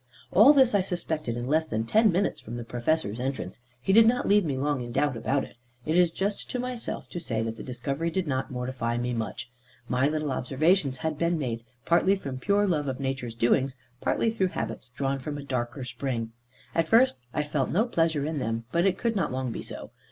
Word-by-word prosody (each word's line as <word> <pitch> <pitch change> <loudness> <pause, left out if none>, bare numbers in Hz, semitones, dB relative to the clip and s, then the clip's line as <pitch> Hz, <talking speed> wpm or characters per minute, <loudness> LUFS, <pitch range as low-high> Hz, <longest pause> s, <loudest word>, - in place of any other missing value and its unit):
All 215 +10 +8
this 265 -5 +5
I 200 - +4
suspected 160 -9 -3
in 120 - -3
less 160 +4 +2
than 110 -3 -1
ten 215 - +4
minutes 190 +3 0
from 115 +2 -7
the 120 - -4
Professor's 120 0 -1
entrance; 130 0 -4 0.2
he 190 +10 +1
did 225 +1 +8
not 245 +2 +2
leave 205 0 +5
me 140 -5 -1
long 145 -1 0
in 120 0 -6
doubt 145 +1 +1
about 135 +5 0
it. - - -11 0.3
It 155 - 0
is 180 -1 +5
just 200 +4 -3
to - - -2
myself 250 -1 -4
to 175 - -5
say 115 -8 -2
that 115 0 -3
the - - -9
discovery 140 +5 -2
did 185 +2 -1
not 130 -3 -1
mortify 125 -2 -2
me 120 +1 -1
much. 115 +1 -4 0.4
My 125 +3 +2
little 155 -1 -1
observations 140 +2 +1
had 155 +1 -3
been 170 0 +2
made, 115 -6 -3 0.2
partly 185 +3 +4
from 135 -9 -6
pure 200 +6 +2
love 155 -7 0
of 130 0 -3
nature's 130 -4 -3
doings, 130 +3 +2 0.3
partly 225 - +1
through 195 -4 +1
habits 130 - -5
drawn 135 +2 -2
from 145 +2 -5
a 145 - -6
darker 130 -1 -3
spring. 125 -3 -3 0.4
At 165 -1 +1
first 235 - +5
I 150 - 0
had 150 - -13
felt 135 -4 +1
no 210 +7 +2
pleasure 165 - +1
in 155 -1 -2
them, 115 -2 -2
but 170 +5 +3
it 190 - +1
could 230 -2 0
not 190 - 0
long 130 -1 -2
be - - -5
so. - - -8
145 Hz, 225 wpm, -27 LUFS, 125-175 Hz, 0.4 s, All